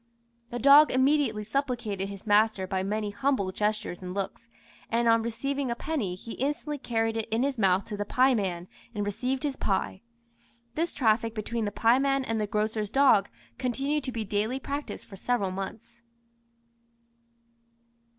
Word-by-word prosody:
The 240 - -4
dog 280 +4 +7
immediately 260 -5 +2
supplicated 220 -5 -2
his 200 0 -9
master 210 -2 +3
by 190 0 -2
many 205 +2 -2
humble 205 -3 0
gestures 210 -2 -2
and 180 0 -6
looks, 200 +3 -4 0.4
and 235 +1 +1
on 230 0 +5
receiving 270 +4 -2
a 235 - -1
penny 240 - -2
he 225 +5 -10
instantly 290 +3 -2
carried 225 -3 -1
it 225 - -3
in 225 +3 +1
his 275 -3 -1
mouth 190 -1 +3
to 210 - -6
the 205 - -1
pieman, 205 -8 +1 0.3
and 205 -1 -1
received 255 +7 -2
his 285 -3 -2
pie. 190 -1 -1 0.7
This 330 +4 -2
traffic 225 -1 +2
between 225 +1 -2
the 205 - -2
pieman 270 +5 +2
and 225 -2 -1
the 210 - -1
grocer's 215 0 -1
dog 260 -5 +4 0.3
continued 275 +4 -1
to 255 - -3
be 225 -3 -3
daily 215 +6 -1
practised 285 +2 -5
for 200 - -11
several 200 -3 0
months." 195 +5 -7
225 Hz, 160 wpm, -28 LUFS, 205-265 Hz, 0.7 s, dog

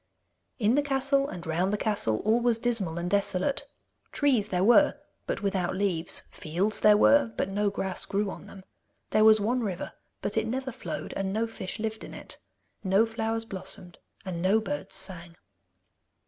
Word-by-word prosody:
In 220 -1 +2
the 290 - +4
castle, 275 0 +1
and 175 -2 -7
round 170 +4 0
the 210 - 0
castle 200 - 0
all 220 +2 +4
was 240 -1 +2
dismal 225 -8 -1
and 170 +1 -2
desolate. 200 +6 0 0.4
Trees 255 -8 +2
there 180 -2 +1
were, 265 +8 +6 0.3
but - - -3
without 190 -2 0
leaves; 185 -4 0
fields 185 +7 -1
there 210 -1 +6
were, 280 +1 +5
but - - 0
no 205 +1 +1
grass 190 -2 -3
grew 200 0 -1
on - - -10
them. 195 - -12 0.5
There 215 - +4
was 220 0 +7
one 240 +5 0
river, 190 -6 -4 0.3
but 210 - -2
it 220 0 +1
never 260 +3 -3
flowed 245 - -6
and 195 -1 -2
no 220 +3 0
fish 225 -4 -6
lived 220 0 -4
in - - -9
it. - - -8 0.4
No 195 +3 +4
flowers 225 0 -2
blossomed, 185 -3 -6 0.3
and 175 -3 -4
no 195 +4 +4
birds 145 -9 -5
sang. 175 -3 -2
210 Hz, 175 wpm, -28 LUFS, 185-225 Hz, 0.5 s, was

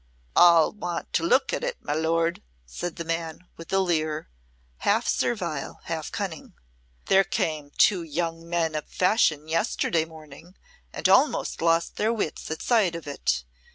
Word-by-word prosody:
"All 170 -2 +6
want 175 -5 -5
to - - +2
look 260 +11 +2
at - - -2
it, - - -2
my 145 - -1
Lord," 165 +2 0 0.2
said 165 - -5
the 170 - -5
man, 165 0 -3
with 165 - -11
a 195 - +2
leer, 155 - -1 0.5
half - - +1
servile, - - -2
half - - -4
cunning. - - -5 0.5
"There 195 0 +5
came 155 -5 -2
two 190 -4 +4
young 165 +1 -2
gentlemen 165 -1 -1
of 155 -1 -4
fashion 165 -6 +2
yesterday 165 0 0
morning, 160 +2 -14 0.3
and - - 0
almost - - +3
lost 165 0 +1
their 220 +2 +1
wits 210 -9 -3
at 160 - -4
sight 210 -8 +2
of 170 - -7
it. 140 - -1
165 Hz, 155 wpm, -26 LUFS, 160-175 Hz, 0.5 s, All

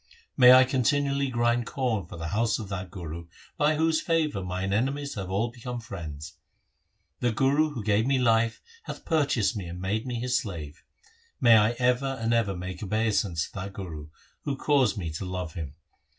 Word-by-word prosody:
May 125 -2 +8
I 130 0 +9
continually 140 +2 +1
grind 120 -1 +1
corn 115 - -1
for 85 - -9
the 85 0 -4
house 110 +4 +1
of 110 -4 -7
that 95 -2 -5
Guru 85 -2 -7 0.3
By 150 +1 +2
whose 160 +1 +2
favour 155 - 0
mine 95 +2 -2
enemies 140 +6 -1
have 95 -3 -5
all 105 +5 0
become 125 0 -6
friends! 80 -7 -8 0.8
The 120 - +1
Guru 140 +7 +2
who 115 - -4
gave 110 +2 +2
me 135 -1 +3
life 115 -2 +2 0.2
Hath - - -8
purchased 140 - +1
me 95 -4 -5
and 85 +1 -7
made 105 +6 -2
me 125 - -3
his 125 +2 -1
slave. 85 - -7 0.6
May 120 -2 +7
I 110 +1 +5
ever 125 +2 +1
and 115 +1 0
ever 110 -5 +1
make 90 0 -6
obeisance 105 -5 0
to - - -15
that 100 0 -6
Guru 80 -7 -7 0.4
Who 140 -2 -2
caused 135 -7 +2
me 85 -5 -3
to 80 - -5
love 90 -3 -4
him 75 -4 -6
110 Hz, 185 wpm, -27 LUFS, 95-130 Hz, 0.8 s, I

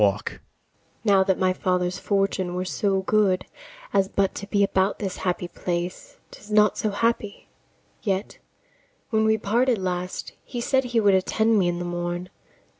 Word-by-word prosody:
Now 200 -3 +5
that 190 -1 +1
my 185 0 +2
father's 180 -1 0
fortune 195 -3 0
were 180 +1 -2
so 195 0 0
good 190 -3 +2 0.5
As 195 -1 +3
but 200 -2 +1
to 200 - -7
be 200 -1 +2
about 190 0 +1
this 195 -3 -4
happy 180 -1 -2
place! 180 - -4
'Tis 210 - -13
not 210 -1 +4
so 215 - -1
happy: 210 0 -1 0.5
yet, 195 -1 -2 0.7
when 220 -1 +3
we 220 0 +3
parted 235 +4 +2
last, 180 -1 -3
He 245 - -6
said 265 +2 +1
he 240 -2 +1
would 205 -2 +4
attend 220 +4 +2
me 180 - +2
in 175 0 0
the 175 - -4
morn. 175 +1 -3
195 Hz, 160 wpm, -24 LUFS, 185-215 Hz, 0.7 s, Now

